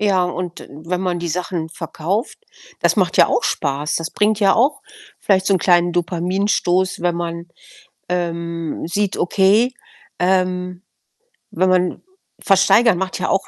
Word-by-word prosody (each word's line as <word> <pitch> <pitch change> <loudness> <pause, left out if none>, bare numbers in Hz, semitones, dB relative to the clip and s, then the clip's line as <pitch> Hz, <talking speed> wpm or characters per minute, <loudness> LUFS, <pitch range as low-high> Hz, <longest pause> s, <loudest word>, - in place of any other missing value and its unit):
Ja, 195 -3 +2
und 180 -1 -5
wenn 165 +5 -5
man 180 -2 -1
die 170 0 -4
Sachen 170 -1 -3
verkauft, 170 +6 -4 0.4
das - - +2
macht - - +1
ja - - +7
auch - - +1
Spaß. 145 +1 -1
Das 165 0 -4
bringt 210 0 +1
ja 195 -1 +4
auch 270 +6 +2 0.4
vielleicht 190 -2 +2
so 195 - +3
'n - - +2
kleinen 175 0 +3
Dopaminstoß, 180 +1 0
wenn 175 -1 +1
man, 170 0 -4 0.6
ähm, 170 -2 -3
sieht: 200 +2 -1
Okay, 205 +7 +3 0.5
ähm, 180 0 0 0.7
wenn 185 +2 +1
man 180 -1 +1 0.4
versteigern 195 +2 +4
macht 190 +1 -3
ja - - -1
auch 195 0 0
180 Hz, 145 wpm, -19 LUFS, 170-195 Hz, 0.7 s, ja